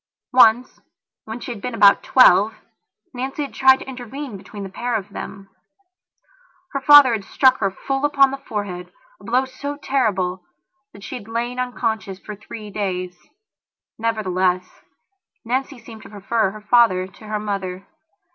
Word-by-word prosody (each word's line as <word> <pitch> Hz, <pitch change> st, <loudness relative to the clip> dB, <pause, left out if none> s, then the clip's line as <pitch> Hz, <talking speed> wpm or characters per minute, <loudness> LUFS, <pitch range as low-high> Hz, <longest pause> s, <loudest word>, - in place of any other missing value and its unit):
Once, 245 Hz, 0 st, +4 dB, 0.5 s
when 220 Hz, +2 st, -7 dB
she 245 Hz, -, -7 dB
had 220 Hz, -4 st, -8 dB
been 250 Hz, +1 st, -4 dB
about 200 Hz, -3 st, +6 dB
twelve, 215 Hz, -4 st, +5 dB, 0.6 s
Nancy 265 Hz, +4 st, -4 dB
had 280 Hz, -, -8 dB
tried 265 Hz, 0 st, +6 dB
to -, -, -11 dB
intervene 260 Hz, 0 st, -7 dB
between 200 Hz, +1 st, -9 dB
the 195 Hz, -, -7 dB
pair 240 Hz, +5 st, -3 dB
of 205 Hz, -3 st, -3 dB
them. 195 Hz, 0 st, -8 dB, 1.2 s
Her 275 Hz, -, -3 dB
father 285 Hz, -2 st, +8 dB
had 215 Hz, -3 st, -2 dB
struck 260 Hz, +6 st, +3 dB
her 195 Hz, -, +1 dB
full 270 Hz, +8 st, -4 dB
upon 280 Hz, -2 st, +4 dB
the 275 Hz, -, -5 dB
forehead 200 Hz, -8 st, -6 dB, 0.3 s
a -, -, -18 dB
blow 250 Hz, +3 st, +1 dB
so 285 Hz, +2 st, -6 dB
terrible 195 Hz, -11 st, -1 dB, 0.5 s
that 200 Hz, -, -15 dB
she -, -, -8 dB
had 210 Hz, -4 st, -12 dB
lain 240 Hz, +2 st, -3 dB
unconscious 225 Hz, -6 st, -3 dB
for 210 Hz, +2 st, -9 dB
three 210 Hz, +1 st, -10 dB
days. 185 Hz, -3 st, -3 dB, 0.8 s
Nevertheless, 185 Hz, -5 st, 0 dB, 0.8 s
Nancy 265 Hz, +3 st, -2 dB
seemed 225 Hz, -2 st, -13 dB
to -, -, -13 dB
prefer 210 Hz, +1 st, -1 dB
her 215 Hz, +2 st, -10 dB
father 210 Hz, -5 st, +3 dB
to 200 Hz, +3 st, -15 dB
her 215 Hz, 0 st, -2 dB
mother. 195 Hz, -2 st, -4 dB
220 Hz, 155 wpm, -21 LUFS, 195-255 Hz, 1.2 s, father